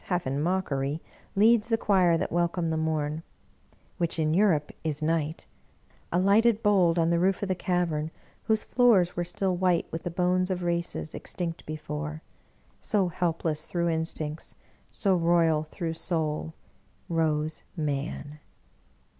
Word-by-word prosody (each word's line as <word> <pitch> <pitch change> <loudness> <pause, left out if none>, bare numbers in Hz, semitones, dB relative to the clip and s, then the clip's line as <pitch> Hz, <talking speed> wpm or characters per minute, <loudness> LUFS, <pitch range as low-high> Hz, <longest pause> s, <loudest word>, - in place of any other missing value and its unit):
half 180 -2 -1
in 135 +2 -1
mockery, 150 -5 -1 0.4
leads 220 +2 +5
the 225 - +3
choir 185 -6 +3
that - - -2
welcome 170 -1 0
the - - 0
morn 155 -1 -1 0.4
— - - -34
which 170 -1 -1
in 155 -1 +1
Europe 175 -6 +3
is 155 -2 -2
night 155 0 -1 0.3
— - - -34
alighted 205 +5 +3
bold 185 -5 +4
on 165 0 +3
the 170 - +2
roof 190 +2 +1
of - - 0
the 190 - +1
cavern, 175 -4 -1 0.4
whose 220 -1 +2
floors 220 -8 +3
were 175 - 0
still 180 +2 -1
white 180 -1 +2
with 165 - -4
the - - -3
bones 180 +2 +1
of 180 -1 -2
races, 170 -2 -2
extinct 170 -2 -4
before 155 0 -5 0.3
— - - -36
so 200 -4 +1
helpless 165 -2 -1
through 170 -1 0
instincts, 160 -1 -3 0.3
so 195 -2 +1
royal 165 -2 +3
through 165 +1 -4
Soul 160 -1 -2 0.3
— - - -39 0.2
rose 155 -2 0 0.2
Man! 145 0 -3
170 Hz, 155 wpm, -27 LUFS, 155-185 Hz, 0.4 s, leads